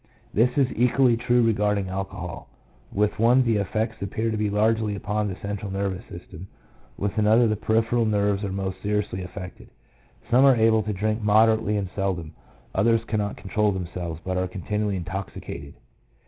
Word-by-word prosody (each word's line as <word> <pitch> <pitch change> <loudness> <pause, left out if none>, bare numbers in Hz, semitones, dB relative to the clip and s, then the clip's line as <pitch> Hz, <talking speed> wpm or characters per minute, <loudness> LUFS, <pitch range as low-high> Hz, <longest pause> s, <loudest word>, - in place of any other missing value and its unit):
This 115 +4 +4
is 135 -3 +4
equally 125 +1 +3
true 120 +1 +2
regarding 105 -3 +1
alcohol; 95 -2 -5 0.4
with 105 +1 0
one 120 +3 +5
the 115 -3 +2
effects 110 +2 -2
appear 110 +3 -2
to - - -1
be 105 -1 0
largely 110 0 +1
upon 105 +1 -2
the 95 - -4
central 100 +1 -5
nervous 95 0 -2
system, 90 +1 -10 0.5
with 100 +2 -2
another 110 +3 +5
the 110 - +1
peripheral 115 +2 +1
nerves 100 -1 +1
are 100 - -2
most 95 -1 -4
seriously 105 -2 -1
affected; 90 0 -9 0.6
some 125 +3 +6
are 135 -2 +7
able 110 -1 +4
to 110 - -3
drink 110 +3 -1
moderately 110 0 +3
and 95 -2 -3
seldom, 90 -5 -2 0.4
others 115 +3 +3
cannot 105 -2 -2
control 105 +2 0
themselves, 90 -3 -5
but 90 0 -1
are 90 0 0
continually 105 +2 -2
intoxicated. 90 -5 -6
105 Hz, 160 wpm, -25 LUFS, 95-110 Hz, 0.6 s, are